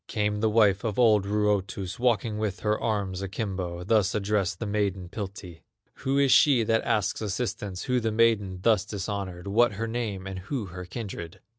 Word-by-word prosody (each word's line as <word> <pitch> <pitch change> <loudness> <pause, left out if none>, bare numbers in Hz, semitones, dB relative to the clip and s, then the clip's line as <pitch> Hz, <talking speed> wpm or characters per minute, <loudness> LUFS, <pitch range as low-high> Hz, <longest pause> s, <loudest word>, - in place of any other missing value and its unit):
Came 105 -1 -1
the 110 +1 +2
wife 105 -3 +3
of 110 -3 -2
old 110 -5 +4
Ruotus, 100 -1 -1
Walking 115 -3 +1
with 105 -2 -2
her 105 0 +1
arms 100 -4 -1
akimbo, 95 -3 -4
Thus 100 -1 +2
addressed 105 -2 0
the 115 - -4
maiden, 100 -3 -1
Piltti: 95 -4 -7 0.4
"Who 135 +1 -1
is 140 -2 +4
she 135 -6 +6
that 115 +1 +1
asks 105 0 0
assistance, 105 -3 -3
Who 125 -1 +1
the 115 -1 -1
maiden 110 -4 +2
thus 110 -4 +4
dishonored, 100 -3 -5
What 110 +3 +3
her 110 +4 -3
name, 110 -5 -3
and 95 -1 -5
who 105 +5 -4
her 90 0 -6
kindred?" 90 -5 -7
105 Hz, 175 wpm, -27 LUFS, 95-110 Hz, 0.4 s, she